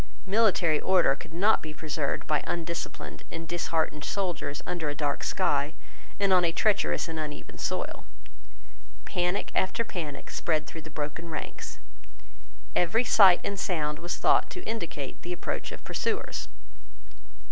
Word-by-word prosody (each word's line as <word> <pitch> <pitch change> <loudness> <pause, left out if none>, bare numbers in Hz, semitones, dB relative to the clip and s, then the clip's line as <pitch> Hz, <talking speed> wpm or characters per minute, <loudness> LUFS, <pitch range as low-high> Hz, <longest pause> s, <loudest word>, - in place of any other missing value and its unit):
Military 190 -7 +3
order 185 -7 +4
could 140 - -11
not 200 +7 +4
be 155 -1 -7
preserved 150 -2 -2
by 150 -2 +1
undisciplined 165 - -4
and 165 -1 -6
disheartened 160 -3 0
soldiers 175 -7 -2
under 165 -4 -1
a 145 - -3
dark 145 -1 -1
sky, 145 +2 +1 0.4
and 200 -1 +4
on 180 -1 +6
a 170 - +3
treacherous 210 +2 +2
and 160 -1 -4
uneven 150 -1 -6
soil. - - -2 1.0
Panic 180 +2 0
after 190 +5 +1
panic 155 -10 -5
spread 155 -2 0
through 160 - -8
the 155 - -10
broken 150 +2 -4
ranks. 155 - -5 1.0
Every 180 +7 +3
sight 195 -6 +7
and 200 -1 -2
sound 150 -5 0
was 175 +1 -3
thought - - +4
to 365 - -7
indicate 170 - -4
the 175 - -4
approach - - -3
of - - -8
pursuers. 450 -1 -2
165 Hz, 145 wpm, -29 LUFS, 150-185 Hz, 1.0 s, sight